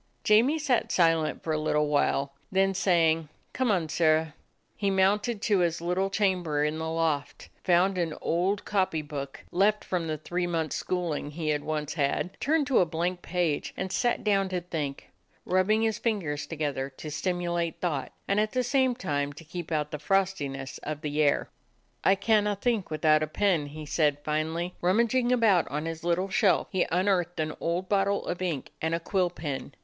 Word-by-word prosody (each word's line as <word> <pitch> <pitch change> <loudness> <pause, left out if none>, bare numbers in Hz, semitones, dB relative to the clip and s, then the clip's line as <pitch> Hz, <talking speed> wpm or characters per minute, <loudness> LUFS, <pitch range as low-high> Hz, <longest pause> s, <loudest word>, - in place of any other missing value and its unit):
Jamie 235 +9 +4
sat 280 -6 0
silent 165 -3 +2
for 160 - -1
a 155 - 0
little 150 -1 +1
while. 140 -1 +1 0.2
Then 195 0 +2
saying, 165 -4 +2 0.2
"Come 260 -2 0
on, 180 -6 +1
Sirrah," 155 0 +2 0.4
he 200 -1 0
mounted 200 +3 +1
to 205 -4 +3
his 170 -2 +1
little 180 +3 0
chamber 180 -7 +1
in 150 +1 -1
the 160 0 -3
loft, 160 -3 -2
found 185 +1 +3
an 165 -3 -1
old 185 +5 0
copy 185 -6 0
book, 140 -2 -7
left 205 +4 +2
from 175 -3 -2
the 155 -1 -2
three 175 +4 -2
months' 165 -3 -1
school 180 -3 -1
ing 145 - -4
he 155 +1 -3
had 150 -1 0
once 150 -1 -3
had, 150 +4 -1
turned 305 +1 +2
to 270 -3 +3
a 180 - +4
blank 175 +2 -2
page, 170 -4 -1
and 190 0 -3
sat 240 +3 0
down 195 -2 +2
to 185 -1 -1
think, 155 -6 -5 0.3
rubbing 195 +4 +2
his 220 -2 0
fingers 160 -11 -2
to 165 - -6
gether 145 -3 -2
to 150 +3 -9
stimulate 175 0 -2
thought, 155 -7 -2 0.2
and 200 +1 +2
at 215 0 0
the 255 -1 +1
same 260 0 +2
time 145 - -2
to 150 - -12
keep 170 +1 -7
out 150 -1 -1
the 150 - -4
frostiness 150 -7 -1
of 150 0 -5
the 150 -1 -1
air. 145 -1 +2 0.6
"I 195 - +5
canna 210 0 +2
think 220 -1 -1
without 155 0 +3
a 155 - 0
pen," 170 -3 +1
he 155 +1 -8
said 150 -1 +1
fin 155 +1 0
ally. 170 +2 -3
Rummaging 235 +7 +2
about 220 -8 +4
on 150 +2 -3
his 165 0 -5
little 175 +3 0
shelf, 190 0 +2
he 185 -3 +1
unearthed 180 -1 +1
an 155 0 -1
old 175 +3 -1
bottle 200 0 +1
of 175 - -4
ink 170 -7 -3
and 160 +1 0
a - - -2
quill 180 +1 0
pen. 145 -5 -6
175 Hz, 190 wpm, -28 LUFS, 155-195 Hz, 0.6 s, I